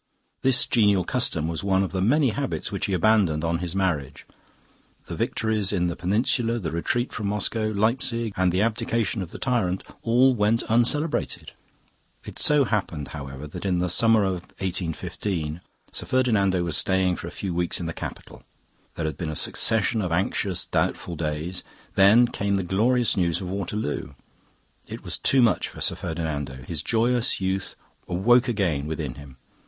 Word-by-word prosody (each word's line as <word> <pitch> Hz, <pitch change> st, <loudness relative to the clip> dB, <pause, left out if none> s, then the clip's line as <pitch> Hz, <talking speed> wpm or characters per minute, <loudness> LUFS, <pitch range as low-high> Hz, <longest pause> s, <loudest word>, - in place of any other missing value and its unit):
This 130 Hz, -2 st, +4 dB
genial 105 Hz, -5 st, +3 dB
custom 90 Hz, -8 st, 0 dB
was 85 Hz, +1 st, -3 dB
one 95 Hz, -1 st, +2 dB
of 95 Hz, -, -3 dB
the 95 Hz, -, -2 dB
many 135 Hz, +7 st, +3 dB
habits 140 Hz, 0 st, -3 dB
which 100 Hz, -, -2 dB
he 100 Hz, -, -2 dB
abandoned 90 Hz, -5 st, +3 dB
on 85 Hz, 0 st, 0 dB
his 90 Hz, 0 st, -4 dB
marriage. 85 Hz, -9 st, -1 dB, 0.8 s
The -, -, -6 dB
victories 110 Hz, -2 st, 0 dB
in 90 Hz, -3 st, +1 dB
the 85 Hz, -, -3 dB
Peninsula, 115 Hz, +5 st, +1 dB
the 85 Hz, -8 st, -3 dB
retreat 120 Hz, +9 st, -1 dB
from 105 Hz, -3 st, -3 dB
Moscow, 105 Hz, +2 st, 0 dB
Leipzig, 115 Hz, +1 st, 0 dB
and 95 Hz, -1 st, +2 dB
the 95 Hz, +4 st, +2 dB
abdication 115 Hz, -1 st, 0 dB
of 90 Hz, -, -5 dB
the -, -, -9 dB
tyrant 110 Hz, -8 st, 0 dB, 0.2 s
all 125 Hz, +3 st, +4 dB
went 110 Hz, 0 st, +1 dB
uncelebrated. 135 Hz, +7 st, +1 dB, 0.7 s
It -, -, -8 dB
so 150 Hz, -1 st, +5 dB
happened, 90 Hz, -, -2 dB
however, 70 Hz, 0 st, -7 dB
that 75 Hz, -, -8 dB
in 95 Hz, -2 st, +1 dB
the 90 Hz, 0 st, +1 dB
summer 115 Hz, +1 st, +4 dB
of 95 Hz, -2 st, -1 dB, 0.2 s
1815 85 Hz, -2 st, -3 dB, 0.3 s
Sir -, -, -3 dB
Ferdinando 100 Hz, -8 st, +2 dB
was 85 Hz, -3 st, -1 dB
staying 95 Hz, -1 st, +2 dB
for -, -, -7 dB
a 85 Hz, -, -10 dB
few 95 Hz, -3 st, -2 dB
weeks 85 Hz, 0 st, 0 dB
in 85 Hz, -, -4 dB
the 85 Hz, -, -3 dB
capital. -, -, -8 dB, 0.5 s
There 80 Hz, -, -3 dB
had 75 Hz, -3 st, -3 dB
been 80 Hz, -, -3 dB
a 80 Hz, -, -4 dB
succession 110 Hz, +6 st, +1 dB
of 90 Hz, -4 st, -2 dB
anxious, 95 Hz, +1 st, -1 dB
doubtful 85 Hz, -, -1 dB
days; 80 Hz, +3 st, -3 dB, 0.3 s
then 100 Hz, +5 st, +6 dB
came 100 Hz, -3 st, -1 dB
the 95 Hz, -, 0 dB
glorious 115 Hz, +6 st, +2 dB
news 85 Hz, -3 st, +1 dB
of 90 Hz, -2 st, -5 dB
Waterloo. 95 Hz, -7 st, -3 dB, 0.7 s
It -, -, -8 dB
was -, -, -4 dB
too 130 Hz, -2 st, +4 dB
much 115 Hz, -, +2 dB
for -, -, -11 dB
Sir -, -, +2 dB
Ferdinando; 75 Hz, -6 st, -4 dB
his 80 Hz, -2 st, -3 dB
joyous 120 Hz, +5 st, +1 dB
youth 95 Hz, 0 st, -2 dB, 0.3 s
awoke 120 Hz, +8 st, +3 dB
again 90 Hz, -, 0 dB
within 75 Hz, -4 st, -3 dB
him. 70 Hz, -1 st, -13 dB
95 Hz, 170 wpm, -25 LUFS, 85-115 Hz, 0.8 s, then